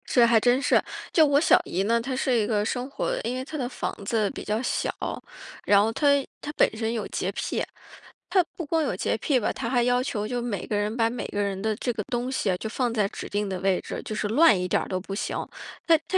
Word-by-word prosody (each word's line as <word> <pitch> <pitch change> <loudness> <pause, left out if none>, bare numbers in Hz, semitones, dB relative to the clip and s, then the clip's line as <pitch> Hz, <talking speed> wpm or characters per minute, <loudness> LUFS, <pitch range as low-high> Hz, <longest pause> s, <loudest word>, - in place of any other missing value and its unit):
这 240 -2 +5
还 230 -1 +5
真 245 +4 +3
是。 - - +4 0.3
就 320 - +6
我 285 -1 +4
小 315 - +5
姨 185 +3 -1
呢， 230 +3 +2
她 260 +2 -3
是 260 -1 +1
一 220 -3 +2
个 210 -2 +1
生 250 +3 -2
活 - - -2
因 240 +3 -2
为 255 - -3
她 310 - -6
的 255 -4 -2
房 250 - -4
子 215 -1 +1
比 - - -7
较 215 +2 -1
小， - - -1 0.7
然 200 -1 +6
后 220 +2 +1
她 290 +6 +1 0.3
她 295 - -5
本 - - +5
身 220 0 -1
有 225 -3 -3
洁 - - -2
癖， - - -2 0.7
她 375 -2 +4
不 335 - -5
光 320 +2 +1
有 - - -1
洁 - - -1
癖 275 -4 +1
吧， 220 - 0
她 230 - -4
还 245 -1 +2
要 245 +1 +2
求 210 -5 -2
就 245 +1 -2
每 230 -6 -3
个 210 - -1
人 210 +2 -1
把 225 -2 +2
每 240 +1 -4
个 205 - -2
人 200 -1 -1
的 220 +1 0
这 245 - -1
个 220 -2 -3
东 250 0 -2
西 235 -7 0
啊， 180 - 0
就 220 - -5
放 240 0 -1
在 210 -3 +2
指 - - -7
定 205 0 -1
的 190 -1 -3
位 190 -1 +2
置， - - -6
就 215 - -5
是 210 - -1
乱 255 - +5
一 180 - -1
点 - - +1
都 185 - -1
不 195 +1 -7
行。 - - -2 0.5
但 330 -1 +6
她 380 - +2
230 Hz, 280 characters per minute, -26 LUFS, 210-255 Hz, 0.7 s, 就